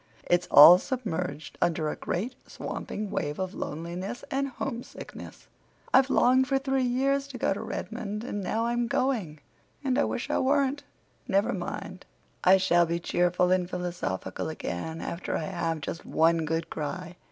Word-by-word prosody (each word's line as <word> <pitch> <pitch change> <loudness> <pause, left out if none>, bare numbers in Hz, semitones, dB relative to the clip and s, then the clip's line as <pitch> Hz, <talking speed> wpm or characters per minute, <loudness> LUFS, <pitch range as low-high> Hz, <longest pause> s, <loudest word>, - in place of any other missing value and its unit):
"It's 175 0 +1
all 170 +5 +10
submerged 180 - -4
under 160 -2 +1
a - - -2
great, 220 +9 -3
swamping 210 -1 -5
wave 150 -6 -2
of 185 0 -3
loneliness 175 +8 -5
and 275 +1 0
homesickness. 260 -2 -7 0.5
I've 265 +1 +6
longed 260 0 +4
for 270 - +2
three 270 -1 0
years 275 +3 +1
to 270 -3 -8
go 210 - +1
to 200 - -6
Redmond—and 210 -1 -4
now 220 +4 -1
I'm 240 0 0
going—and 250 - -2
I - - +4
wish 240 - -3
I - - +2
weren't! 280 +1 +2 0.5
Never 205 +5 +2
mind! 185 0 -6 0.4
I 185 +1 +7
shall 175 -2 +3
be 170 +1 -1
cheerful 180 +1 +1
and 180 -1 +2
philosophical 180 - -3
again 160 - -5
after 170 - -3
I - - -3
have 165 -4 -2
just 165 - -5
one 165 0 +2
good 160 +1 -2
cry. 175 +3 -5
185 Hz, 150 wpm, -28 LUFS, 170-250 Hz, 0.5 s, all